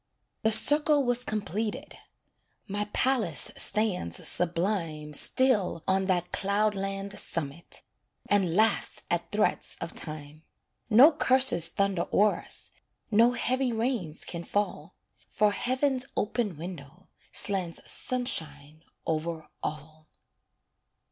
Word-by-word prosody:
The 220 - +2
circle 295 +4 +6
was 245 -1 +2
completed 215 -1 -4 0.7
My 205 +1 -2
palace 210 - +1
stands 190 - 0
sublime 165 -4 -1
Still 205 - +2
on 190 0 +1
that 180 -2 -1
cloudland 200 0 -1
summit, 160 0 -3 0.4
And 190 -5 +1
laughs 220 +2 +1
at - - -2
threats - - 0
of - - -6
Time. 155 -1 -7 0.5
No 250 +8 +8
curses 260 - +4
thunder 195 -1 -1
o'er 210 +1 +2
us, - - -5 0.4
No 230 +3 +4
heavy 255 +1 0
rains 225 - -2
can 170 -1 -6
fall; 180 -4 -3 0.3
For 210 0 +2
heaven's 260 +3 -1
open 210 -5 -1
window 170 0 -9 0.2
Slants 185 -4 -1
sunshine 155 - -3 0.2
over 160 0 -3
all. 155 +1 -7
195 Hz, 105 wpm, -28 LUFS, 165-225 Hz, 0.7 s, No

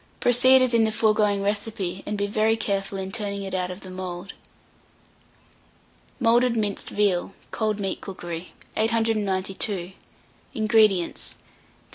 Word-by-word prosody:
Proceed 255 +2 +6
as 250 -1 +2
in 230 -1 +4
the 220 - +1
foregoing 210 -2 +2
recipe, 200 -3 -2
and 210 - -2
be 200 - 0
very 215 +2 +1
careful 195 -2 -2
in 190 0 -4
turning 200 -2 -3
it 190 -1 -6
out 180 -1 -1
of 180 +2 -8
the 185 - -9
mould. 185 0 -6 1.9
MOULDED 240 0 +3
MINCED 210 -2 -2
VEAL 195 -2 0 0.2
(Cold 215 -2 -1
Meat 195 -2 -3
Cookery). 175 -2 -7 0.2
892. 205 -4 0 0.6
INGREDIENTS. 215 -5 +2
3/4 - - -28
lb. - - -29
205 Hz, 135 wpm, -24 LUFS, 190-220 Hz, 1.9 s, Proceed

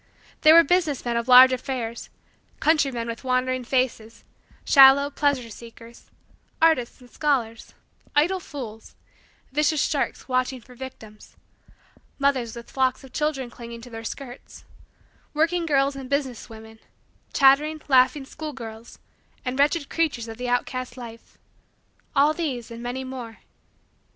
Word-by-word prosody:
There 310 +1 +7
were 335 - +9
business 320 -5 0
men 240 -1 -1
of 235 +1 -2
large 255 +1 +9
affairs; 245 -2 -4 0.5
countrymen 275 -7 +1
with 230 +2 -6
wondering 255 0 0
faces; 235 -3 -2 0.4
shallow, 275 +1 +7
pleasure 280 -5 0
seekers; 230 +1 -14 0.5
artists 315 -7 +2
and 245 - -17
scholars; 245 -7 -2 0.4
idle 350 +6 +2
fools; 240 -10 -9 0.6
vicious 300 +1 +1
sharks 285 -3 -2
watching 255 0 -1
for 250 +2 -17
victims; 235 -4 -11 0.8
mothers 265 -5 0
with 235 0 -11
flocks 260 -1 0
of 265 - -14
children 285 -5 -2
clinging 235 -1 -10
to 245 +1 -12
their 225 0 -8
skirts; 245 +2 -9 0.7
working 330 +2 +1
girls 275 -2 +2
and 265 -2 -8
business 275 -4 -2
women; 220 0 -13 0.5
chattering, 295 +3 +4
laughing, 270 +1 +3
schoolgirls; 240 -7 -9 0.5
and 255 +2 -3
wretched 290 +1 +2
creatures 295 -8 -1
of 225 0 -8
the 250 0 -4
outcast 250 0 -2
life 230 -2 -11 0.8
all 290 +3 +4
these 270 -9 -4
and 230 0 -8
many 245 +2 -4
more. 250 -4 -8
255 Hz, 130 wpm, -24 LUFS, 235-285 Hz, 0.8 s, were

